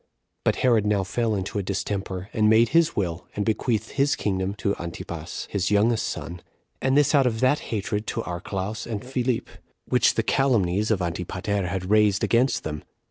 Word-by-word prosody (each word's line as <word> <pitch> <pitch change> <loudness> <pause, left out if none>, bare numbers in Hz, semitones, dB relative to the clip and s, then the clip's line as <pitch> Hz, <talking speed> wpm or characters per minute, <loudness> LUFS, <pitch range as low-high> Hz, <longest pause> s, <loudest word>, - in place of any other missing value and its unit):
But - - +2
Herod 115 -4 +4
now 105 -2 +2
fell 110 +3 -1
into 95 +1 -3
a - - 0
distemper, 95 -1 -3
and 110 -2 +3
made 115 +1 +5
his 165 +1 +3
will, 90 -4 -2
and 105 - -1
bequeathed 110 0 0
his 140 +1 +2
kingdom 95 -1 -1
to 100 -1 -1
[Antipas], 85 -1 -6
his 95 -3 0
youngest 110 +3 +2
son; 85 0 -6 0.4
and 135 +1 +2
this 145 0 +4
out 140 -3 +5
of 110 -2 -1
that 130 +3 +3
hatred 105 0 -2
to 115 - -2
Archelaus 95 +4 -4
and 110 -1 -4
Philip, 125 -2 -1 0.4
which - - +3
the - - +1
calumnies 105 -7 +2
of 100 -5 +1
Antipater 90 +3 -2
had 90 +1 -3
raised 105 -2 +4
against 125 +3 +2
them. 75 -1 -4
105 Hz, 180 wpm, -25 LUFS, 95-115 Hz, 0.4 s, made